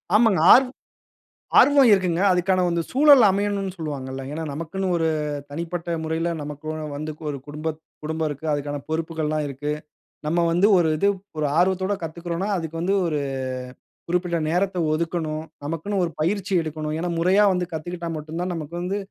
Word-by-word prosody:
ஆமாங்க. 220 Hz, -5 st, +4 dB
ஆர்வம், 255 Hz, 0 st, +4 dB, 0.8 s
ஆர்வம் 280 Hz, -3 st, +6 dB
இருக்குங்க. 180 Hz, -2 st, +1 dB
அதுக்கான 185 Hz, +1 st, +2 dB
அந்த 170 Hz, 0 st, 0 dB
சூழல் 280 Hz, -1 st, +7 dB
அமையணுன்னு 200 Hz, -1 st, -1 dB
சொல்வாங்கள்ல. 135 Hz, -4 st, -5 dB
ஏன்னா, 160 Hz, +2 st, -4 dB
நமக்குன்னு 175 Hz, +5 st, -3 dB
ஒரு 165 Hz, -1 st, +1 dB, 0.4 s
தனிப்பட்ட 170 Hz, +2 st, -3 dB
முறையில 160 Hz, +2 st, -1 dB
நமக்கு 145 Hz, +1 st, -8 dB, 0.3 s
வந்து 155 Hz, +1 st, -4 dB, 0.2 s
ஒரு 140 Hz, -, -3 dB
குடும்பத் 155 Hz, +1 st, -5 dB, 0.2 s
குடும்பம் 160 Hz, 0 st, -1 dB
இருக்கு. 145 Hz, +2 st, -7 dB
அதுக்கான 145 Hz, 0 st, -3 dB
பொறுப்புகள் 160 Hz, -1 st, -2 dB
எல்லாம் 155 Hz, 0 st, -1 dB
இருக்கு. 145 Hz, +2 st, -4 dB, 0.6 s
நம்ம 170 Hz, +3 st, +1 dB
வந்து 180 Hz, +4 st, +4 dB
ஒரு 170 Hz, -3 st, +3 dB
இது 200 Hz, -, +3 dB, 0.3 s
ஒரு 150 Hz, -, +1 dB
ஆர்வத்தோட 190 Hz, +2 st, +2 dB
கத்துக்கிறோன்னா, 170 Hz, +3 st, -4 dB
அதுக்கு 165 Hz, -1 st, -5 dB
வந்து 190 Hz, +3 st, +1 dB
ஒரு 150 Hz, -3 st, -1 dB, 0.9 s
குறிப்பிட்ட 175 Hz, 0 st, 0 dB
நேரத்த 185 Hz, +2 st, 0 dB, 0.2 s
ஒதுக்கணும். 160 Hz, -1 st, -2 dB, 0.2 s
நமக்குன்னு 165 Hz, +6 st, -2 dB
ஒரு 170 Hz, -, -1 dB
பயிற்சி 195 Hz, +5 st, -1 dB
எடுக்கணும். 155 Hz, -1 st, -4 dB
ஏன்னா 175 Hz, +2 st, -2 dB
முறையா 185 Hz, +5 st, +4 dB
வந்து 180 Hz, -1 st, -1 dB
கத்துக்கிட்டா 170 Hz, +2 st, -5 dB
மட்டும் 155 Hz, +2 st, -6 dB
தான் 180 Hz, 0 st, -2 dB
நமக்கு 165 Hz, 0 st, -6 dB
வந்து 190 Hz, +3 st, -2 dB
170 Hz, 155 wpm, -23 LUFS, 155-185 Hz, 0.9 s, சூழல்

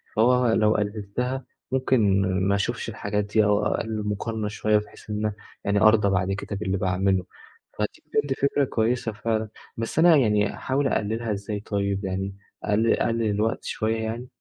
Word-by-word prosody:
فهو 125 Hz, +3 st, +4 dB
لو 110 Hz, -1 st, +4 dB
قلِّلتها 110 Hz, +5 st, -2 dB, 0.3 s
ممكن 120 Hz, -7 st, +3 dB, 0.3 s
ما 100 Hz, -, +3 dB
أشوفش 100 Hz, -, -2 dB
الحاجات 105 Hz, 0 st, -2 dB
دي 105 Hz, +1 st, +2 dB
أو 105 Hz, 0 st, +2 dB
أقلِّل 110 Hz, -1 st, -1 dB
المقارنة 105 Hz, +1 st, -2 dB
شوية 105 Hz, 0 st, +1 dB
بحيث 105 Hz, +1 st, -8 dB
إن 105 Hz, 0 st, -1 dB, 0.3 s
يعني 100 Hz, 0 st, +1 dB
أرضى 110 Hz, -2 st, +5 dB
بعد 95 Hz, 0 st, +1 dB
كده 100 Hz, +1 st, -4 dB
باللي 95 Hz, -1 st, -1 dB
باعمله. 95 Hz, 0 st, +1 dB, 0.5 s
فدي 105 Hz, 0 st, -3 dB
بجد 145 Hz, -1 st, 0 dB
فكرة 140 Hz, +1 st, +2 dB
كويسة 115 Hz, -1 st, 0 dB
فعلًا، 110 Hz, 0 st, -2 dB, 0.3 s
بس 115 Hz, +7 st, -2 dB
أنا 170 Hz, 0 st, +7 dB
يعني 105 Hz, -6 st, +3 dB
أحاول 135 Hz, +1 st, 0 dB
أقلِّلها 110 Hz, +1 st, -1 dB
إزاي 100 Hz, +1 st, -4 dB
طيب 100 Hz, -1 st, -2 dB
يعني 95 Hz, +1 st, -3 dB, 0.3 s
أقلِّل 110 Hz, +2 st, +2 dB
أقلِّل 115 Hz, -1 st, +1 dB
الوقت 105 Hz, +2 st, 0 dB
شوية 110 Hz, +1 st, -1 dB
يعني؟ 115 Hz, +3 st, -4 dB
105 Hz, 160 wpm, -25 LUFS, 100-115 Hz, 0.5 s, أنا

